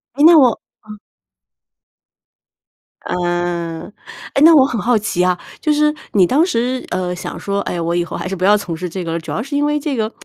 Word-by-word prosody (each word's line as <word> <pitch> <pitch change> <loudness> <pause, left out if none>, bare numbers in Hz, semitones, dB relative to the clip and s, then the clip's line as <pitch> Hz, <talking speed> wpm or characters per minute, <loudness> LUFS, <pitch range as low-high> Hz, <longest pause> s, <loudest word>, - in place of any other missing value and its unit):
诶， 285 - +1
那 330 +1 +8
我 260 -5 +6 0.4
嗯。 210 0 -10 2.1
嗯。 175 0 -3 0.4
诶， 275 - +2
那 330 +1 +8
我 270 -3 +6
很 240 -5 -3
好 240 +1 +2
奇 205 -4 -1
啊， 180 -1 +1 0.2
就 305 - +1
是 300 0 +2 0.2
你 195 -3 +5
当 295 - +3
时， 255 -6 -1
呃， 180 -1 -2
想 180 - -7
说： 200 0 -2
“哎， 175 - -4
我 170 +1 -1
以 175 - +1
后 - - -6
还 - - -5
是 195 - -4
不 185 - -6
要 205 +2 +5
从 180 -5 -5
事 180 +2 -5
这 185 +2 -5
个”， 165 0 -3
主 160 - -8
要 - - -2
是 285 +2 -6
因 290 +1 +1
为 295 0 0
这 290 -2 -3
个， 220 -2 -2
205 Hz, 230 characters per minute, -17 LUFS, 175-275 Hz, 2.1 s, 那